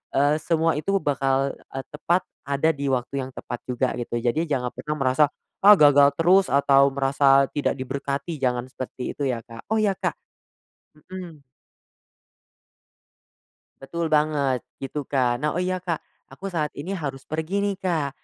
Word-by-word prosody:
eee, 145 +2 +4
semua 165 0 +1
itu 195 +6 -1
bakal, 135 -1 +1
eee, 135 - -8
tepat, 170 +4 0 0.2
ada 140 +3 +2
di 140 -2 -4
waktu 130 +1 -1
yang - - -12
tepat 120 - -6
juga, 125 0 0
gitu. 120 0 -4
Jadi 155 +8 0
jangan 125 -4 -1
pernah 150 0 -4
merasa, 135 +1 +3 0.3
"Ah 205 +2 +9
gagal 145 -3 +6
terus," 180 +5 +4
atau 140 0 +4
merasa 135 0 +4
tidak 145 - 0
diberkati. 140 +4 -4
Jangan 125 -1 -1
seperti 130 -1 -5
itu 140 - -2
ya, 120 -3 -2
Kak. 115 -1 -12
Oh 220 - 0
ya, 215 -2 +3
Kak - - -1 0.8
Mhm. 175 -2 -10 2.4
Betul 165 +5 -3
banget. 150 -4 +2 0.2
Gitu, 140 +2 -4
Kak. 125 -3 +1
Nah 150 - +1
oh 180 - 0
iya, 185 0 -1
Kak 170 -3 -2 0.3
aku 135 +9 -8
saat 155 -5 -2
ini 155 +6 -5
harus 140 -7 -5
pergi 160 +4 -4
nih, 200 -1 0
Kak. 165 -6 0
140 Hz, 160 wpm, -24 LUFS, 135-165 Hz, 2.4 s, Ah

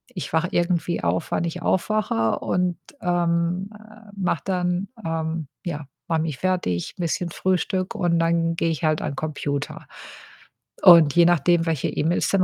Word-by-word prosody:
ich 175 - -5
wache 165 +2 +2
irgendwie 175 -1 0
auf, - - 0
wann - - 0
ich 170 +1 -4
aufwache 185 - 0
und, 180 -1 0 0.2
ähm, 175 +2 0
äh, 215 0 -16
mache 180 -5 0
dann, 180 0 -1 0.2
ähm 160 -1 -2 0.2
ja, 150 -5 -5 0.2
mache 165 -2 +1
mich 155 -5 -4
fertig, 180 - -1
‘n - - -5
bisschen 170 +1 -1
Frühstück 185 +2 -1
und 175 -4 +1
dann 165 0 +1
gehe 165 - 0
ich 160 - -4
halt 155 0 +2
an 140 - -3
Computer. 145 -1 -4 1.0
Und 165 -5 +8
je 170 -1 +6
nachdem, 175 0 +3
welche 160 -4 0
E-Mails 165 +4 0
dann 195 -2 +3
170 Hz, 160 wpm, -23 LUFS, 160-180 Hz, 1.0 s, Und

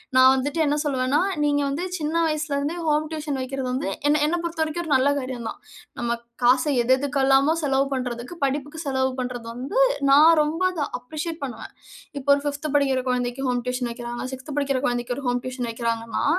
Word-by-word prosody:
நான் 260 0 +8
வந்துட்டு 285 +5 -2
என்ன 290 0 +2
சொல்வேன்னா, 270 -1 +1 0.2
நீங்க 290 -1 +2
வந்து 285 +5 -2
சின்ன 310 0 -2
வயசுலருந்தே 305 0 -1
ஹோம் 305 0 +2
டியூஷன் 300 -3 -3
வக்கிறது 260 0 -3
வந்து 265 +4 -2 0.2
என்ன 295 0 +3
என்ன 345 +3 0
பொறுத்தவரைக்கும், 330 0 -2
ஒரு 315 - -5
நல்ல 265 +2 +4
காரியம் 255 -3 -4
தான். - - -8 0.4
நம்ம 235 0 -1 0.3
காச 250 +1 +5 0.2
எது 255 +2 +4
எதுக்கெல்லாமோ 275 +1 +3
செலவு 275 -1 +2
பண்றதுக்கு, 250 +2 -4
படிப்புக்கு 290 +3 -3
செலவு 265 -1 +1
பண்றது 245 -2 -4
வந்து 270 - -2 0.3
நான் 300 +4 +8
ரொம்ப 310 +4 -3
அத 300 -5 -2
அப்ரிஷியேட் 310 +5 -5
பண்ணுவேன். 245 -5 -7 0.5
இப்ப 270 - -13
ஒரு 280 - -3
5த் 285 +2 -3
படிக்கிற 270 -2 +1
கொழந்தைக்கு 250 +1 -1
ஹோம் 245 -1 0
டியூஷன் 250 -1 -1
வக்கிறாங்க. 240 +1 -5
6த் 265 +3 -7
படிக்கிற 275 -2 0
கொழந்தைக்கு 245 0 -2
ஒரு 280 - -6
ஹோம் 245 0 +1
டியூஷன் 255 -2 -3
வக்கிறாங்கன்னா 230 0 -2
270 Hz, 180 wpm, -24 LUFS, 250-295 Hz, 0.5 s, நான்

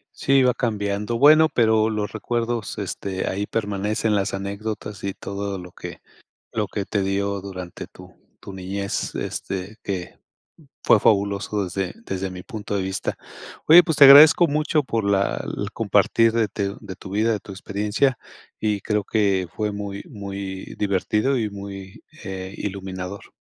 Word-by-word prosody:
Sí, 135 0 +3
va 125 -1 +4
cambiando, 105 -1 -2
bueno, 155 +4 +7
pero 110 -4 +3
los 105 -2 -2
recuerdos 120 -2 -2
este, 95 -1 -4
ahí 100 +2 -2
permanecen 105 0 -1
las 100 0 0
anécdotas 100 +1 -5
y 100 - -2
todo 100 0 -5
lo 90 -1 -10
que - - -9 0.5
lo 105 -2 -1
que 100 0 -4
te 100 0 -1
dio 100 +1 -1
durante 95 -2 -7
tu - - -15 0.3
tu 100 - -9
niñez, 95 +1 -4
este, 95 +2 -4
que 90 -3 -5 0.7
fue - - +5
fabuloso 100 0 +1
desde 95 0 -3
desde 95 0 -3
mi 90 0 -9
punto 105 -4 -5
de 100 - 0
vista. 95 +1 -3 0.5
Oye, 170 +3 +9
pues 160 -4 -1
te 140 - +9
agradezco 150 +5 +9
mucho 150 0 +1
por 115 -3 -1
la 100 -1 +1 0.2
el - - -4
compartir 115 0 +3
de 115 -1 +2
te 100 0 -3
de 95 - -8
tu 95 - -10
vida, 110 +3 +2
de 105 - -2
tu - - -13
experiencia, 105 +7 0 0.4
y 105 -2 0
creo 105 +1 0
que 100 -3 +1
fue 105 -1 -1
muy 100 -1 -6
muy 100 -2 -7
divertido 105 +6 +1
y 110 -4 -1
muy, 100 -1 -9 0.2
eh, 95 0 -6
iluminador. 95 -1 -6
100 Hz, 160 wpm, -23 LUFS, 95-110 Hz, 0.7 s, Oye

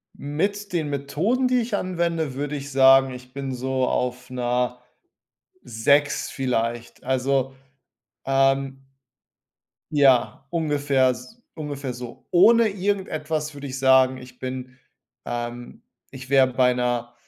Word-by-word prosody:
Mit 200 +8 -3
den 155 -4 -1
Methoden, 160 - 0
die 250 -1 +2
ich 225 -2 -2
anwende, 170 -6 -1
würde 145 +2 -3
ich 140 0 -6
sagen, 135 0 +6
ich 125 0 -12
bin 135 -1 -4
so 130 0 -1
auf 125 0 -2
'ner 125 0 -1 0.8
6 140 +6 +1
vielleicht. 120 -2 -3
Also, 135 +1 0 0.7
ähm, 135 0 +1 1.1
ja, 135 -4 +3
ungefähr 145 -5 +1
s 225 - -9
ungefähr 145 -4 -5
so. 120 0 -10
Ohne 225 +6 +6
irgendetwas 165 -6 -2
würde 140 0 -8
ich 130 0 -5
sagen, 130 0 +4
ich 125 -1 -13
bin 130 0 -6 0.5
ähm, 120 0 -6 0.3
ich 130 -1 -10
wär 135 -1 +6
bei 125 0 +2
'ner 120 -1 -2
135 Hz, 120 wpm, -23 LUFS, 125-150 Hz, 1.1 s, sagen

